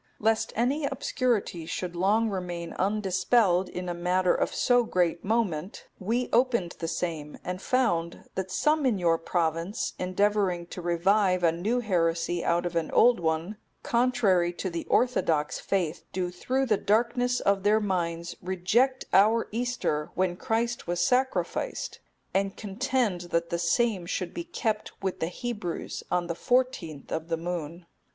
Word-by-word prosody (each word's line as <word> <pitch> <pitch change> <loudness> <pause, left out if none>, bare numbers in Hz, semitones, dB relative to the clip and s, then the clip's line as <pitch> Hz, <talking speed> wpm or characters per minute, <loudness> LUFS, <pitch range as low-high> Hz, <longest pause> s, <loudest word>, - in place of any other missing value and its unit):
Lest 220 +1 +1
any 270 +6 +1
obscurity 210 -14 -1
should 175 0 -4
long 205 +6 +2
remain 175 -3 -4
undispelled 190 -1 +2
in 180 0 -5
a 175 - -1
matter 180 +1 +2
of - - 0
so 245 -1 +3
great 175 -6 0
moment, 195 -5 -1
we 235 +6 0
opened 235 -8 +2
the 165 - -3
same, 160 -3 -3
and 180 +1 -4
found 175 -11 0
that 190 0 -3
some 300 +9 +2
in 230 -5 +2
your 165 -2 +2
province, 165 +4 -1
endeavouring 185 -1 +1
to 180 - -8
revive 185 +2 +2
a 165 - +5
new 210 +9 -1
heresy 170 -4 0
out 170 +1 +1
of 175 -1 -3
an 165 -2 0
old 240 -3 +5
one, 165 +5 -1 0.3
contrary 215 -8 +2
to 180 +1 -4
the 170 0 -4
orthodox 160 -12 +1
faith, 180 -4 -1
do 180 -1 -2
through 260 +9 -1
the 215 -5 +2
darkness 245 +4 +1
of 200 -1 +2
their 210 +2 +4
minds 170 -4 -2
reject 205 +9 +1
our 220 +4 +5
Easter, 230 -10 -1
when 185 -1 +1
Christ 235 +1 -1
was 175 0 -1
sacrificed; 260 - 0 0.3
and 195 +1 0
contend 220 -2 -1
that 170 0 0
the 170 - 0
same 185 +1 +1
should 180 -1 -3
be 340 0 -5
kept 220 -10 -2
with 190 -1 -2
the 160 - 0
Hebrews 195 -2 -4
on 180 -1 +1
the 170 - -2
fourteenth 210 - -1
of 160 0 -3
the 165 -1 -1
moon." 170 0 -5
185 Hz, 155 wpm, -27 LUFS, 170-230 Hz, 0.3 s, a